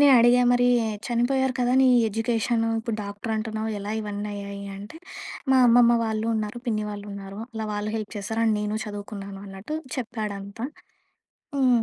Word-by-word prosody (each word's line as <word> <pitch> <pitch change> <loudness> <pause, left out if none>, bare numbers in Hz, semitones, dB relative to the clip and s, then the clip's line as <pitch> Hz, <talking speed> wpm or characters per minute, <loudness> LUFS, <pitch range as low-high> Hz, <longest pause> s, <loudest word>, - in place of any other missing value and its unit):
నే 290 - +8
అడిగా 240 +1 +6
మరి 245 0 +4 0.4
చనిపోయారు 255 +2 +1
కదా! 245 0 +2
నీ 265 - +6 0.2
ఎడ్యుకేషను 225 +1 0
ఇప్పుడు 225 -1 -2
డాక్టర్ 205 +2 -5
అంటున్నావు 220 0 -2
ఎలా 200 +1 -5
ఇవన్నీ 205 0 -4
అయ్యాయి 200 0 -6
అంటే. 205 +10 -9 0.5
మా 265 - +6
అమ్మమ్మ 240 0 +7
వాళ్ళు 220 0 -1
ఉన్నారు, 215 +2 -2
పిన్ని 215 -2 0
వాళ్ళు 205 0 -7
ఉన్నారు 195 +1 -7
అలా 220 -1 -3
వాళ్ళు 205 +1 -2
హెల్ప్ 215 0 -5
చేశారు. 220 +3 -2
అండ్ 215 -1 +3
నేను 210 +1 -1
చదువుకున్నాను 200 -1 -7
అన్నట్టు 195 +10 -5 0.2
చెప్పాడంతా. 215 -3 -4 0.9
హ్మ్. 250 -4 +4
220 Hz, 155 wpm, -25 LUFS, 205-240 Hz, 0.9 s, నే